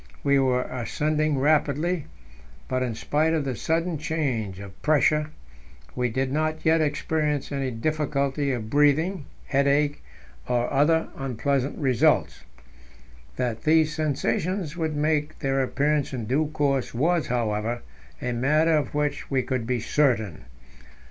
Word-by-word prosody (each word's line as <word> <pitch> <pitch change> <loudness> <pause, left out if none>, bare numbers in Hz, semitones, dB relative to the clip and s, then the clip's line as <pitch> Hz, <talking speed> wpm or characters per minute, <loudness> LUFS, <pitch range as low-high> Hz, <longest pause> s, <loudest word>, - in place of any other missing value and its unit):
We 140 -1 +4
were 125 -1 +2
ascending 150 +4 -1
rapidly, 150 +3 +1 0.6
but, 130 0 -1
in 120 -3 -2
spite 155 +7 +1
of 150 -3 -1
the 130 -2 -2
sudden 165 - -1
change 130 - -2
of 100 -1 -11
pressure, 150 0 +2 0.7
we 125 -1 0
did 130 +3 -1
not 155 +2 -1
yet 160 0 +4
experience 150 -1 -1
any 135 -2 -1
difficulty 140 +2 -1
of 120 -4 -3
breathing, 150 +3 +2 0.2
headache, 145 +1 +1 0.4
or 120 +1 0
other 160 +4 +3
unpleasant 135 +1 -1
results. 130 -6 +2 0.9
That 120 -3 -2
these 155 -1 +3
sensations 155 +3 -1
would 160 -3 -2
make 150 0 0
their 135 0 0
appearance 145 +2 0
in 120 -4 -3
due 140 +7 +1
course 140 -5 -1
was, 165 +6 +1
however, 115 0 -1 0.4
a 125 - -2
matter 150 +7 +2
of 150 -1 -1
which 150 -1 -1
we 130 -2 +1
could 125 -2 -2
be 125 -1 0
certain. 110 - 0
145 Hz, 135 wpm, -25 LUFS, 130-155 Hz, 0.9 s, We